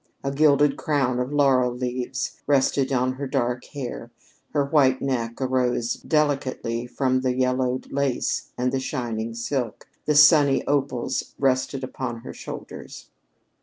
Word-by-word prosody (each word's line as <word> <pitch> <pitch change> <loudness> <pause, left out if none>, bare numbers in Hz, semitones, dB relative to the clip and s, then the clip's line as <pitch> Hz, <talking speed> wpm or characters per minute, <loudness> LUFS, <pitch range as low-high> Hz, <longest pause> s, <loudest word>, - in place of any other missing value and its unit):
A 135 - -1
gilded 145 0 +4
crown 135 -5 0
of 125 +2 -2
laurel 135 -4 +3
leaves 125 +1 -4
rested 135 -1 +2
on 130 0 +1
her 140 +1 -5
dark 125 -2 -1
hair; 125 -4 -6 0.4
her 145 -2 +1
white 140 -3 +3
neck 120 -4 -2
arose 125 -2 0
delicately 135 -6 -1
from 130 0 0
the 130 -1 0
yellowed 130 0 0
lace 140 -2 -1
and 125 +1 0
the 135 - 0
shining 115 -3 -3
silk; 120 -1 -3 0.2
the 150 - +2
sunny 145 -2 +6
opals 135 -4 -1
rested 135 0 0
upon 125 -2 -5
her - - -8
shoulders. - - -9
130 Hz, 135 wpm, -24 LUFS, 125-140 Hz, 0.4 s, sunny